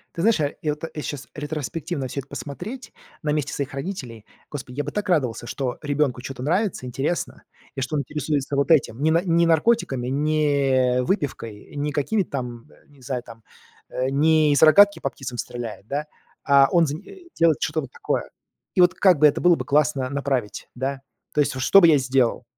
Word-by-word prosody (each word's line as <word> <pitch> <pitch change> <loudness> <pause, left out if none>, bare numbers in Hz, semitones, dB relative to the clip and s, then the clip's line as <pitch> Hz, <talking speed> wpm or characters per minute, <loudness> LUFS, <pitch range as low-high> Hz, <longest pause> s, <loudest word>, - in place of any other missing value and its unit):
Ты - - -4
знаешь, 225 -1 +4
э, 145 -2 -1
я 150 -1 0
вот 150 - -10
я 150 - -5
щас 145 -2 -6
ретроспективно 150 0 -4
всё 135 +2 -4
это 135 - -16
посмотреть. 175 - -7 0.3
На 150 - -1
месте 150 -2 -2
своих 140 -1 -4
родителей, 135 - -6 0.2
господи, 130 -3 -8
я 145 - 0
бы - - -5
так 210 -1 -3
радовался, 125 - 0
что 130 -3 -3
ребенку 145 -4 0
чё-то 135 -1 -7
нравится, 180 - 0
интересно, 135 +7 -3 0.3
и - - -4
что 135 +4 -2
он 145 - 0
интересуется 145 0 -2
вот 140 +3 0
этим. 140 -5 +3
Не 160 - +3
на 165 +2 +3
не 170 -1 +3
наркотиками, 160 - +2
не 140 -3 +2
выпивкой, 125 - -3
не 145 +1 -2
какими-то 170 +7 -1
там, 120 -4 -5 0.2
не 145 -2 -21
знаю, 125 -2 -4
там, 115 -1 -13 0.5
э, 130 +1 -2
не 155 +1 +3
из 145 - +2
рогатки 200 +6 +7
по 135 - -2
птицам 130 -3 -7
стреляет, 115 -4 -6
да, 145 +2 -2 0.4
а 140 -1 +5
он 170 -2 +4
зани 150 +3 -5
э, 380 -3 -14
делает 165 -2 +4
что-то 155 0 -1
вот 135 -4 -9
такое. - - -3 0.5
И - - +4
вот 180 0 +5
как 185 -5 +4
бы 150 - +6
это 145 - +2
было 175 -1 +5
бы - - -5
классно 145 -2 +1
направить, 140 -6 -2
да? 135 +2 -3 0.3
То - - +1
есть 145 -1 +1
вот 130 - -3
что 195 - +7
бы 170 - +6
я 150 -3 +6
сделал? 130 -2 +1
145 Hz, 200 wpm, -23 LUFS, 130-160 Hz, 0.5 s, рогатки